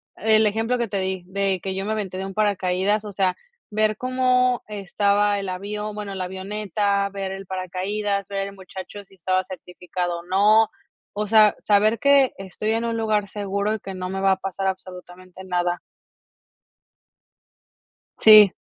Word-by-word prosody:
el 220 0 +3
ejemplo 225 +4 0
que 235 -1 -1
te 200 -1 -2
di, 190 -1 -2
de 195 0 -1
que 190 -1 -3
yo 195 +1 -3
me 215 - -2
aventé 195 -4 -4
de 190 - -3
un 195 - -7
paracaídas, 205 0 +1
o 210 - -7
sea, 185 -1 +1 0.4
ver 215 0 +1
cómo 255 -1 +2
estaba 205 0 +1
el 195 -1 -4
avión, 210 +3 -4
bueno, 205 -2 -5
la 185 -1 -3
avioneta, 200 +1 -1
ver 195 -1 -5
el 195 -1 -7
paracaídas, 195 +2 -2
ver 195 0 -3
el 200 - -9
muchacho 190 +1 -9
si 195 0 -21
estaba 185 +1 0
certificado 180 -1 -5
o - - -11
no, 210 +4 +4 0.5
o 210 +1 -2
sea, 215 -1 +6
saber 215 +2 +4
que 280 -2 +5
estoy 195 +3 -4
en 230 +1 0
un 230 0 -1
lugar 215 -2 0
seguro 200 +1 -2
y 220 - -3
que 195 -1 -8
no 185 0 -4
me 195 0 -3
va 195 0 +4
a - - -3
pasar 195 0 -3
absolutamente 185 0 -7
nada. 175 -1 -1 2.4
Si. 210 -3 +9
200 Hz, 170 wpm, -23 LUFS, 190-215 Hz, 2.4 s, Si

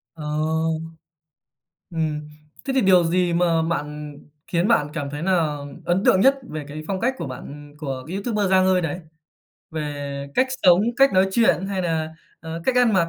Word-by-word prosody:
Ờ, 155 - -8 1.7
ừm. 155 -2 -2 0.4
Thế 270 - -1
thì 265 - +3
điều 185 -3 +5
gì 175 +1 +1
mà 170 -1 +2
bạn 150 -2 -4 0.3
khiến 175 +3 +1
bạn 150 -11 +3
cảm 145 -3 -3
thấy 145 +1 -6
nà 165 -5 +1 0.3
ấn 180 +3 +1
tượng 185 - +5
nhất 270 +5 +6
về 155 -2 -5
cái 155 +2 -7
phong 190 -1 -2
cách 250 +5 +1
của - - -4
bạn 145 +3 -9
của 135 -4 -5
YouTuber 200 0 -1
Giang 185 0 +4
Ơi 185 -1 +3
đấy? 165 +2 -3 0.7
Về 145 -2 -4
cách 260 - +3 0.2
sống, 180 0 +6 0.2
cách 275 +1 +5
nói 190 +1 +4
chuyện 210 -4 +3
hay 195 -1 -2
nà, 160 -2 -2 0.3
ờ, 165 0 -6
cách 255 -1 +1
ăn 245 -3 +4
mặc? 170 -3 +2
170 Hz, 180 wpm, -23 LUFS, 150-190 Hz, 1.7 s, nhất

